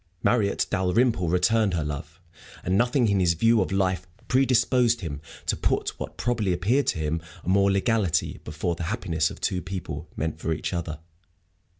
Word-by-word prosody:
Marriott 105 -5 +2
Dalrymple 95 0 +2
returned 100 +2 +2
her 80 - 0
love, 75 +3 -6 0.4
and 90 - 0
nothing 120 +3 +3
in 100 -2 +2
his 85 -2 +3
view 115 +5 +4
of 95 - -1
life 95 -2 0 0.2
predisposed 125 -2 +3
him 75 -5 -5 0.2
to - - +1
put - - 0
what - - -6
probably 110 -6 0
appeared 110 +11 +1
to - - +1
him 80 +1 -1 0.2
a - - -4
mere 100 +1 +4
legality 100 -3 +1
before 80 +3 -2
the 85 0 -4
happiness 85 -8 0
of - - -10
two 90 - -1
people 85 -4 -6
meant 80 0 -2
for 80 - -1
each 80 - -4
other. 85 -3 -3
95 Hz, 175 wpm, -26 LUFS, 85-115 Hz, 0.4 s, view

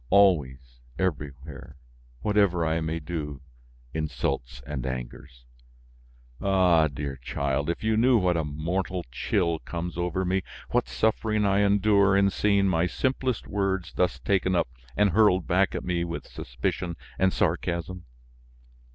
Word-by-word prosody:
Always, 70 -11 +3 0.2
everywhere, 75 -6 -4 0.4
whatever 100 -5 +2
I 80 +1 0
may 80 +1 -2
do, 75 -4 -5 0.5
insults 70 -5 -3
and 70 -4 -4
angers! 60 0 -7 1.0
Ah! 90 -5 +4
dear 70 -1 -5
child, 70 +4 -2
if 85 - -3
you 110 0 +2
knew 120 +2 +4
what 90 -4 +2
a 85 - 0
mortal 85 +5 -3
chill 85 +4 0
comes 85 0 -5
over 90 +2 -1
me, 95 +1 +1 0.3
what - - +1
suffering 105 - +1
I 100 0 +3
endure 100 -1 +4
in 100 0 +4
seeing 100 -1 +2
my 85 -1 +2
simplest 130 +4 -1
words 95 -3 -2
thus 90 - +1
taken 95 -2 +1
up 85 -8 +1 0.3
and 105 -1 +4
hurled 95 -3 +4
back 95 +2 +2
at - - -3
me 85 -1 -1
with 85 0 -5
suspicion 85 +8 -4 0.2
and 95 0 +4
sarcasm! 90 +1 -1
85 Hz, 135 wpm, -26 LUFS, 75-100 Hz, 1.0 s, Ah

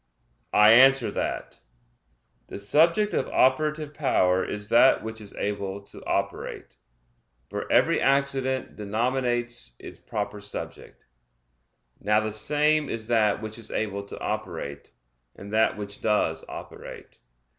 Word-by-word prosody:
I 105 +1 +7
answer 130 +1 +6
that, - - -4 0.9
The - - -7
subject 165 - +3
of - - 0
operative 150 +3 +1
power 95 -11 +2
is 105 0 -5
that 120 +2 +5
which 110 0 -6
is 100 - -8
able 100 -1 -3
to 100 - -14
operate, - - -3 0.7
for - - -5
every - - +3
accident 135 -1 0
denominates 120 - -1
its - - -11
proper 105 0 -5
subject. 105 - -8 0.9
Now 105 +1 +2
the 110 0 -3
same 150 +6 +1
is 115 -1 -4
that 110 -2 +2
which 110 +1 -6
is 115 - -5
able 100 -2 -2
to - - -9
operate, 85 -9 -5 0.4
and 100 +1 -10
that 110 0 +2
which 100 -1 -6
does 105 -7 +1
operate. - - -10
110 Hz, 125 wpm, -26 LUFS, 105-130 Hz, 0.9 s, I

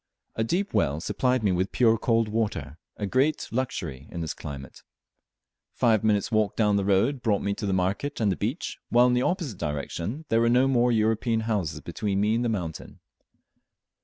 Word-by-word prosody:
A 110 - -1
deep 185 - -1
well 70 +2 +1
supplied 125 +7 0
me 100 - +3
with 90 +2 0
pure 115 -2 +4
cold 115 0 +1
water, 105 -10 -2 0.2
a 105 - -2
great 135 +8 +1
luxury 80 - -3
in 85 - -5
this 80 - -3
climate. 70 -3 -9 0.9
Five 115 -3 +3
minutes' 105 0 +1
walk 110 -3 +1
down 105 -2 +2
the 100 - +1
road 105 +8 +2
brought 105 -4 +1
me 100 - 0
to 100 - -4
the - - 0
market 95 +10 -1
and 105 -3 +2
the - - 0
beach, 120 - -3
while 120 +1 +5
in 125 - +3
the 125 - +2
opposite 155 - -2
direction 85 - -4
there 115 0 +3
were 115 - +3
no 125 +2 +4
more 125 -2 +3
European 110 +1 +1
houses 105 -8 -2
between 100 -2 -2
me 105 +2 +2
and 115 +2 +1
the 120 - 0
mountain. 90 -7 -5
110 Hz, 190 wpm, -26 LUFS, 95-120 Hz, 0.9 s, while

